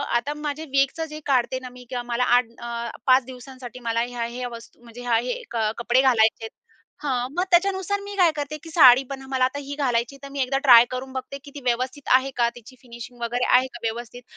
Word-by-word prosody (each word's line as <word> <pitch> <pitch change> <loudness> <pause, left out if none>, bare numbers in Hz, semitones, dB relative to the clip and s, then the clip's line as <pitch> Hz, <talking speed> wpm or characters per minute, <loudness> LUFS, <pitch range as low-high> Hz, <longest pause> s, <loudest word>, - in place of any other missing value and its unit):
आता 265 +5 0
माझे 300 +1 -5
वीकचं 275 +4 +1
जे 305 - -6
काढते 260 -1 +1
ना, 255 -1 -9
मी 250 0 -13
किंवा 245 -1 -3
मला 240 +1 -1
8 250 - +2
अ, 235 0 -5 0.2
5 255 -1 +5
दिवसांसाठी 255 -1 -10
मला 230 0 +1
ह्या-ह्या 245 +1 -4
वस्तू 230 0 -12
म्हणजे 235 +1 -11
ह्या 240 -2 +1
हे 245 +1 -3
कपडे 235 +3 +1
घालायचे 225 -4 +3
आहेत, - - -8 0.5
हं. 250 -3 -1
मग 360 - +3
त्याच्यानुसार 385 +2 +2
मी 405 0 -8
काय 350 -4 +4
करते 295 +1 -4
की 325 - -10
साडी 265 -5 +7
पण 270 -1 -6
मला 260 -1 +2
आता 285 +2 -3
ही 285 0 -7
घालायची 245 -2 -1
आहे, - - -16
तर 275 - -9
मी 275 - -2
एकदा 265 +1 0
ट्राय 240 -3 +8
करून 260 +1 -5
बघते 260 +1 -6
की 285 - -12
ती 285 - -7
व्यवस्थित 255 +3 -2
आहे 265 +1 +1
का, 235 -1 +3
तिची 240 +2 -14
फिनिशिंग 240 0 -11
वगैरे 245 +1 -1
आहे 255 +1 +4
का - - -8
व्यवस्थित? 240 +2 -5
255 Hz, 220 wpm, -23 LUFS, 240-275 Hz, 0.5 s, ट्राय